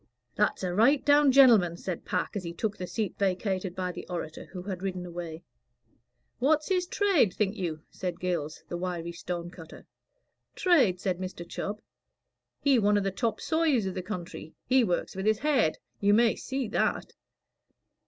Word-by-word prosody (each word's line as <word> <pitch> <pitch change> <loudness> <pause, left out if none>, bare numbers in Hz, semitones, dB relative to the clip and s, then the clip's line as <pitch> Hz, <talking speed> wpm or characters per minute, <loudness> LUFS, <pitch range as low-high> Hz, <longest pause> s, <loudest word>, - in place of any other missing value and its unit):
"That's 210 -1 0
a 180 -1 -1
right 255 +8 +4
down 290 -1 +6
genelman," 225 -11 +6
said 180 -2 -5
Pack, - - -2
as 200 - -3
he 170 -1 -5
took 215 +3 -2
the 180 -4 -6
seat 210 -3 -3
vacated 190 -1 -1
by 185 -1 -2
the - - -9
orator, 165 -3 -5
who 180 -2 -8
had 185 -2 -5
ridden 185 -2 -3
away. 170 -1 -7 1.0
"What's 300 +4 +2
his 365 -2 +1
trade, 365 - +2
think 210 0 0
you?" 165 -6 -4
said 180 -2 -4
Gills, 170 -4 -3
the 175 - -4
wiry 175 -1 -3
stone 175 0 -5
cutter. 165 -3 -12 0.7
"Trade?" 260 - +3
said 185 -1 -1
Mr. 185 -2 -6
Chubb. 210 +4 -5 0.8
"He 275 -4 +4
one 205 -1 +3
of 205 - +1
the 195 - 0
top 220 +2 -1
sawyers 315 -9 +1
of 190 - -2
the 185 - -3
country. 175 -4 -7
He 260 -1 +4
works 180 -3 -1
with 190 +2 -2
his 215 -1 +4
head, 265 - +2 0.2
you 205 0 +4
may 230 0 +4
see 265 -2 -3
that." - - -1
195 Hz, 175 wpm, -28 LUFS, 175-235 Hz, 1.0 s, down